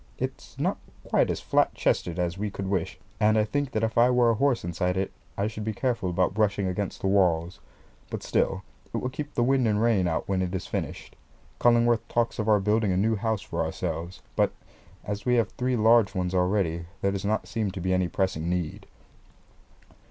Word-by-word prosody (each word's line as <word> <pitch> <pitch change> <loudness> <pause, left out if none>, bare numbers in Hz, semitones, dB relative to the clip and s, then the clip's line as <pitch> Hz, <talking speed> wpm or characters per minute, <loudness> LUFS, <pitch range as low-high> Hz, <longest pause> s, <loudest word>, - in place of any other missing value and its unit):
It's - - -6
not - - 0 0.2
quite - - +2
as - - -2
flat - - +2
chested 85 -1 0
as 90 -1 -1
we 105 +2 -2
could 95 -1 -5
wish; 95 -2 -1 0.2
and 110 0 +4
I 110 - +4
think 145 +6 -1
that 110 -3 -2
if 110 +1 +1
I 120 +1 +6
were 125 -2 +4
a - - +2
horse 130 +2 +1
inside 90 +2 -1
it, 95 0 -1 0.3
I 100 - +1
should 110 0 -4
be 110 +1 -2
careful 115 -6 -1
about 90 +1 +1
brushing 100 -2 +1
against 95 +1 -3
the - - 0
walls; 90 -3 +2 0.5
but - - -5
still - - 0 0.3
it - - +1
will 125 - -2
keep 145 +2 -6
the 120 - +2
wind 130 -1 +3
and 105 -1 +2
rain 110 -5 +3
out 80 -1 -1
when 95 -1 0
it 90 0 -2
is 95 - -3
finished. - - -5 0.4
Cullingworth 120 -1 +4
talks 120 0 0
of 110 0 0
our 105 -1 +5
building 105 +1 +2
a 90 - +1
new 110 +4 +2
house 110 0 -1
for - - -2
ourselves; 85 +2 -4
but - - +3 0.5
as 105 0 -4
we 125 -1 +2
have 115 -3 +2
three 125 0 -1
large 110 -2 +4
ones 90 0 -1
already 90 -3 +1
there 100 - +2
does 100 -1 -3
not 110 +2 0
seem 110 -3 -1
to 95 0 -6
be 95 +1 0
any 90 -1 +2
pressing 85 -3 -1
need. 90 -3 -3
100 Hz, 210 wpm, -27 LUFS, 90-115 Hz, 0.5 s, I